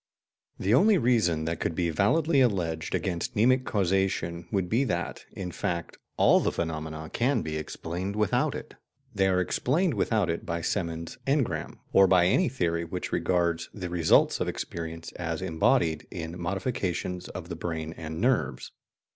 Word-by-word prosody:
The 100 +4 +1
only 200 - +6
reason 110 - +2
that 80 0 -2
could 85 - -1
be 85 -2 0
validly 145 - +3
alleged 85 -9 0
against 95 +7 -2
mnemic 130 +4 +3
causation 95 -3 0
would 95 -3 0
be 115 +8 +2
that, 85 -7 -3
in 90 -2 -5
fact, 85 0 -3 0.2
all - - +6
the - - 0
phenomena 80 -1 -4
can 130 +4 +1
be 80 -1 -4
explained 85 +5 -4
without 105 -2 +1
it. - - -8 0.4
They 95 -1 +2
are 90 -1 +2
explained 150 - +1
without 105 -2 +1
it 85 0 -2
by 85 0 -3
Semon's 85 -2 -3
"engram," 125 - 0 0.2
or 95 0 +7
by 90 -2 +5
any 170 - +3
theory 85 -9 -1
which 90 +2 -5
regards 85 -1 0
the 90 -4 -5
results 85 -2 +4
of - - -1
experience 80 -1 -5
as - - -3
embodied 80 0 +1
in 85 -1 -6
modifications 90 -2 -2
of - - -7
the - - -4
brain 80 -1 -4
and 80 0 -6
nerves. 95 - 0
90 Hz, 160 wpm, -28 LUFS, 85-105 Hz, 0.4 s, or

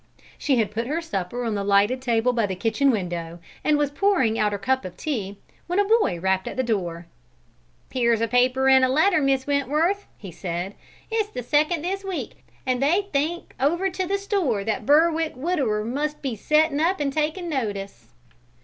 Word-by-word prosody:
She 270 -3 +1
had 215 -3 +1
put 230 +2 -3
her 305 +5 -1
supper 245 - -4
on 225 - -1
the 200 -1 -2
lighted 205 +6 +3
table 240 -1 +1
by 230 -3 +1
the 190 - -3
kitchen 225 +8 +1
window 175 -7 -2 0.3
and 300 -1 +3
was 290 -1 0
pouring 290 - +2
out 210 -1 +2
her 205 - -2
cup 260 +5 0
of 180 -1 -8
tea, 205 -10 -3 0.3
when 355 +2 -1
a 405 - +4
boy 425 - +2
rapped 190 +1 0
at - - -6
the 260 - +1
door. 175 -7 -2 0.9
"Here's 235 -3 +2
a 230 - +1
paper 255 +3 +2
and 265 0 +6
a 255 - +4
letter, 315 +5 +3
Miss 270 -1 +1
Wentworth," 300 +8 0
he 195 -4 -9
said. 175 +2 -4 0.4
"It's 440 -2 0
the 250 -12 -6
second 300 +5 +1
this 390 +3 -2
week, 325 - -5 0.2
and 255 0 0
they 365 +8 +2
think 310 +5 -1
over 345 +8 +1
to 370 0 -3
the 395 +2 0
store 375 - -1
that 220 +1 0
that - - -13
Berwick 320 +2 +3
widower 255 -8 -1
must 295 +6 -3
be 260 -4 -2
settin' 305 +6 +2
up 345 +3 +1
and 280 -2 -1
takin' 315 +4 -1
notice!" 205 - -4
265 Hz, 195 wpm, -24 LUFS, 215-315 Hz, 0.9 s, and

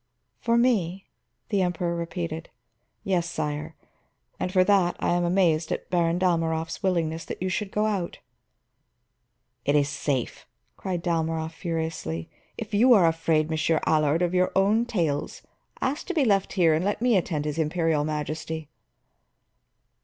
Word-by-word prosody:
"For 235 0 +2
me?" 195 -7 +1 0.4
the 200 -4 +1
Emperor 175 -1 -1
repeated. 170 -1 -4 0.5
"Yes, 175 -3 0
sire. 150 -1 -4 0.6
And 185 - -2
for 185 -1 +4
that 185 -3 +3
I - - 0
am 175 0 +2
amazed 170 -3 +2
at - - -4
Baron 170 -1 +2
Dalmorov's 165 -2 0
willingness 165 -3 0
that - - -6
you 185 - -1
should 195 +2 -2
go 210 +2 0
out." 200 -5 -2 1.5
"It 145 - +1
is 145 -1 +3
safe," 140 -3 -3 0.3
cried 180 -3 -4
Dalmorov 160 -2 -1
furiously. 160 - -4 0.3
"If 220 -2 -7
you 245 +5 +6
are 190 -5 +5
afraid, 160 -1 +1
Monsieur 160 +1 +1
Allard, 155 +2 +2
of 175 0 0
your 185 0 +2
own 210 +5 +3
tales, 165 -11 -2 0.4
ask 275 +4 -2
to 365 - -3
be 295 -5 +3
left 195 -4 +2
here 170 -4 +4
and 155 +3 +1
let 205 +3 -1
me 245 -3 +4
attend 160 -5 0
his 150 +1 -2
Imperial 160 -1 +1
Majesty." 155 +1 -4
170 Hz, 150 wpm, -26 LUFS, 160-190 Hz, 1.5 s, you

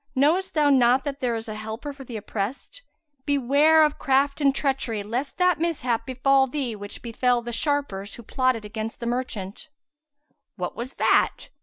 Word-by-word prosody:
Knowest 335 +8 +2
thou 295 -2 +4
not 255 0 +4
that 285 -1 -4
there 245 -2 0
is 225 +1 -5
a 215 - -4
Helper 220 +7 -6
for 275 -1 -11
the 240 -3 -7
oppressed? 215 - -5 0.5
Beware 285 +3 +4
of 300 - -2
craft 275 +2 +1
and 280 - +5
treachery, 260 -7 -1
lest 245 +7 -4
that 360 -3 +3
mishap 255 -9 -1
befal 265 +1 +3
thee 255 -4 -3
which 205 0 -7
befel 240 +1 +1
the 240 - -5
sharpers 235 -7 -1
who 235 - -11
plotted 255 -1 0
against 220 +1 -5
the 235 - -5
merchant." 235 0 -4 0.9
"What - - -4
was 250 +3 -6
that?" - - +2
255 Hz, 170 wpm, -25 LUFS, 230-285 Hz, 0.9 s, and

